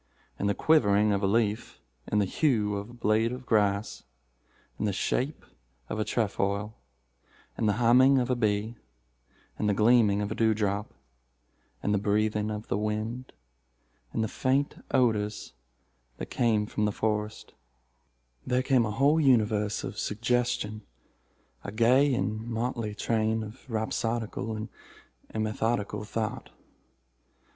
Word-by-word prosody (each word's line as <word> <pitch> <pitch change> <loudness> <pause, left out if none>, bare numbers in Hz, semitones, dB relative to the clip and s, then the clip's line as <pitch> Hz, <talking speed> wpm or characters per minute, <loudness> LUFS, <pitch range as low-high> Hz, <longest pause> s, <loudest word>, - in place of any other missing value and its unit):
In 100 - 0
the 100 - +1
quivering 105 -9 +3
of 100 - 0
a 100 - +2
leaf—in 105 - -2
the 105 - +3
hue 105 - +1
of 100 +2 -5
a - - -12
blade 115 -1 +1
of 125 +1 -7
grass—in 100 - -3
the 105 - +1
shape 135 +9 -2 0.4
of 110 - -3
a - - +2
trefoil—in 100 - -4
the 105 - +3
humming 125 +4 +5
of 125 0 +1
a - - +2
bee—in 100 - -5
the 105 - +2
gleaming 110 -2 +4
of 105 - -4
a - - 0
dew 110 -1 +2
drop—in 65 - -6
the 105 - +2
breathing 105 +1 0
of 105 0 -5
the 100 - -1
wind—in 65 - -6
the 110 - +1
faint 135 +6 -1
odors 110 -4 0 0.6
that - - -7
came 110 -3 +2
from 105 0 -1
the 105 - +1
forest—there 60 - -5
came 130 -4 +3
a - - -3
whole 140 +8 +3
universe 110 -6 +2
of - - -5
suggestion—a 110 - -4
gay 125 +6 +4
and 110 -2 -2
motley 115 -2 -3
train 110 0 0
of 110 +5 -11
rhapsodical 110 0 -2
and 110 0 -5 0.6
immethodical 110 -1 -1
thought. 115 +3 -4
105 Hz, 125 wpm, -28 LUFS, 100-115 Hz, 0.6 s, humming